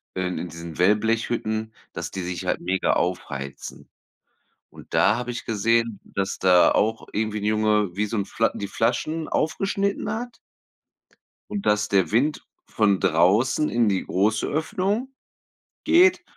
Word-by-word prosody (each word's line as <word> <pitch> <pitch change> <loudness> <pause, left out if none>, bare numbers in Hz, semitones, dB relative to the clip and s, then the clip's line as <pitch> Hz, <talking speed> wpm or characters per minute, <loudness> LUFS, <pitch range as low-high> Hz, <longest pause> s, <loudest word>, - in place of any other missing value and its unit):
äh, 95 - -2
in 90 -1 -4
diesen 85 -1 -9
Wellblechhütten, 110 +2 0 0.2
dass - - -5
die 95 - -4
sich 90 -2 -5
halt - - -1
mega 95 0 +1
aufheizen, 70 -6 -4 0.8
und - - -15
da 110 +3 +4
habe 125 0 -4
ich 120 - -6
gesehen, 115 0 +1
dass 100 -1 -3
da 90 -2 +5
auch 110 +2 0
irgendwie 110 0 -2
'n - - -7
Junge 105 -2 +2
wie 105 - +1
so 115 - -4
'n 100 - -1
Fla 115 - 0
die 100 - -4
Flaschen 155 +8 -1
aufgeschnitten 195 +5 -1
hat 235 +1 -6 1.1
und 205 -1 -4
dass 105 0 +2
der 95 -1 +2
Wind 140 +7 +1 0.2
von 100 -3 +1
draußen 105 - +3
in 120 -2 +2
die 95 - 0
große 105 +4 +1
Öffnung 205 - -2 0.7
geht 360 +3 +5
110 Hz, 145 wpm, -24 LUFS, 95-125 Hz, 1.1 s, da